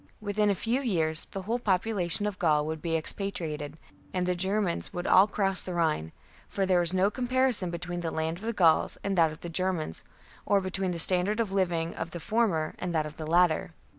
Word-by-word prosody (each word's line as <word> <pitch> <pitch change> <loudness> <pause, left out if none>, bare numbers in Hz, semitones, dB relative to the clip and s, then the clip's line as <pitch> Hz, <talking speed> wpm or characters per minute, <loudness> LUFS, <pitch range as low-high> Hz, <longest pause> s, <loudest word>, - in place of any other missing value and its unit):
Within 210 0 0
a 200 - +2
few 235 +8 -1
years 165 - +1
the 195 - -7
whole 230 +5 -1
popu 210 0 0
lation 180 0 +1
of 205 -1 -5
Gaul 150 -5 +2
would 160 0 -4
be 165 -1 0
expatriated, 155 -4 -2 0.4
and 180 -1 0
the 180 - +1
Germans 190 0 -1
would 175 -1 -5
all 190 +2 +6
cross 195 -3 -1
the 180 - -5
Rhine; 155 - 0 0.4
for 195 - -1
there 185 -1 +3
was 170 -1 +2
no 190 +2 +2
comparison 255 -6 +1
between 175 +1 -4
the 165 - -2
land 160 +2 -2
of - - -14
the 230 - -1
Gauls 170 -7 +3
and 200 -1 -1
that 165 -3 +4
of 155 - -11
the - - -6
Germans, 170 - -1 0.4
or 200 - +3
between 190 0 -2
the 175 - -3
standard 185 +5 +2
of 220 -4 0
living 175 -4 0
of 165 - -5
the 170 - -7
former 170 -5 0
and 175 -2 -3
that 155 -1 +1
of 150 0 -9
the 155 - -6
latter. 170 -1 +2
180 Hz, 220 wpm, -28 LUFS, 165-200 Hz, 0.4 s, all